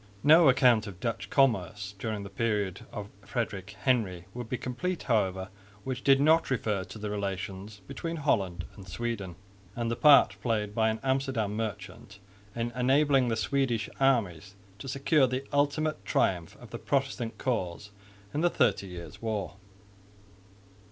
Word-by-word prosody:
No 155 +1 +7
account 125 -4 +4
of 95 -3 -9
Dutch 115 +3 -3
commerce 105 - +1
during 110 -2 -3
the 100 - -8
period 105 -3 -1
of 105 -1 -6
Frederick 105 -4 -4
Henry 100 -10 +1
would 120 -2 -6
be 125 - -1
complete, 170 +10 -3
however, 95 -5 0 0.3
which 130 -1 -4
did 135 -1 +5
not 160 +3 +4
refer 105 -6 0
to 95 - -10
the 105 -1 -4
relations 100 0 -5
between 165 - -4
Holland 95 - 0
and 100 -2 -12
Sweden, 100 -4 -4 0.4
and 115 -1 -2
the - - 0
part 145 +2 +6
played 105 -4 -1
by 110 0 +2
an 110 0 -2
Amsterdam 130 -6 0
merchant 105 -2 -6 0.4
in 120 0 -2
enabling 135 +2 +3
the 115 - 0
Swedish 125 -2 0
armies 105 -8 +1 0.2
to 135 - -8
secure 140 +1 +3
the 130 +2 -3
ultimate 145 -1 +1
triumph 90 -3 0
of - - -13
the - - -6
Protestant 135 -4 -1
cause 105 -5 -3 0.4
in 150 - -1
the 175 - +4
Thirty 100 - +1
Years' 90 +3 -9
War. 110 -4 -3
115 Hz, 150 wpm, -29 LUFS, 100-135 Hz, 0.4 s, No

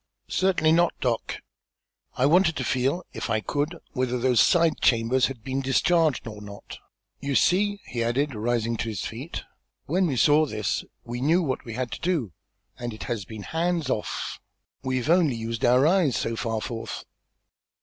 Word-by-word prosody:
"Certainly 185 -4 +2
not, 170 +1 +3
Doc. 120 -3 -2 0.8
I 125 - +3
wanted 165 +2 +4
to - - -2
feel, 135 +8 0
if - - -4
I 110 - +2
could, 145 +9 -2
whether 125 -2 -1
those 125 -1 +2
side 170 -3 +3
chambers 120 +1 +3
had 125 -5 -8
been 135 0 -2
discharged 155 +2 +2
or 105 -2 -8
not. 100 -1 -10 0.4
You 140 -1 -2
see," 205 +6 +3
he 120 -2 -2
added, 135 +5 0
rising 115 +1 -1
to 115 - -2
his 105 -3 -4
feet, 130 +9 -6 0.4
"when 180 +4 +1
we 140 - -1
saw 150 +4 +4
this, 110 -5 -2 0.2
we 120 +1 -5
knew 165 +6 +3
what 130 -5 -2
we 115 - -6
had 125 -1 -3
to - - -6
do, 165 - 0 0.5
and 120 -2 -4
it - - -8
has 115 -6 -3
been 110 +1 -8
'hands 165 - -1
off.' 105 - -3 0.4
We've 130 0 -1
only 165 -6 +4
used 115 0 -4
our 125 +3 +5
eyes 165 -6 +3
so 115 - -1
far 115 -1 -2
forth." 115 -1 -5
130 Hz, 175 wpm, -26 LUFS, 115-160 Hz, 0.8 s, our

